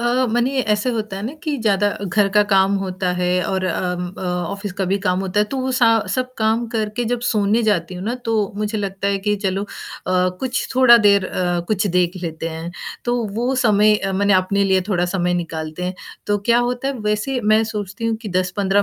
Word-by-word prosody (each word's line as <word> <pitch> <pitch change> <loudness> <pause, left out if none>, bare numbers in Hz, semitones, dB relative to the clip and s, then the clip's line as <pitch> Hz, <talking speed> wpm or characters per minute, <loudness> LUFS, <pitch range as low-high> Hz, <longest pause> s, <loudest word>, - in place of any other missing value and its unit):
अ, 240 - 0 0.3
मने 255 +3 +1
ऐसे 210 +5 0
होता 215 -4 -3
है 195 - -6
ना 240 +6 -4
कि 305 -3 -1
ज़्यादा 205 -1 +2 0.2
घर 200 +2 +2
का 210 - +7
काम 195 0 +4
होता 185 -1 -2
है 180 0 +1
और 190 -1 -1
अम 180 -1 -2
अ, - - -6
ऑफिस 180 +3 -3
का 195 - +1
भी 200 - +2
काम 185 -2 0
होता 195 +1 0
है, - - +4
तो 270 - -5
वो 260 0 -1
स 255 - 0 0.3
सब 255 0 -2
काम 220 +2 +1
करके 220 0 -2
जब 245 - -1
सोने 210 +2 +2
जाती 185 -5 0
हूँ 180 +1 -6
ना 230 +3 -1
तो 225 0 +1 0.2
मुझे 210 +1 -2
लगता 195 -1 -2
है 200 0 0
कि 210 - +3
चलो 195 +1 0
अ, - - -6 0.4
कुछ 185 +7 0
थोड़ा 255 -2 +8
देर 200 -2 +4
अ, 175 -1 -1
कुछ 210 -1 +1
देख 180 -1 +1
लेते 165 -1 -4
हैं, 165 +1 -6 0.3
तो 240 0 +1 0.2
वो 245 +4 0
समय 210 0 +4
मने 200 +1 +3
अपने 190 +2 +2
लिए 190 -1 +3
थोड़ा 180 -4 +1
समय 180 -1 +1
निकालते 165 -1 -4
हैं, 180 +1 -3 0.3
तो 205 0 +1
क्या 235 - +5
होता 250 +2 -2
है 275 - -2
वैसे 230 +5 -1
मैं 220 +1 +5
सोचती 205 +2 -4
हूँ 225 -1 0
कि 215 - -5
10-15 195 +2 +1
200 Hz, 215 wpm, -20 LUFS, 185-220 Hz, 0.4 s, थोड़ा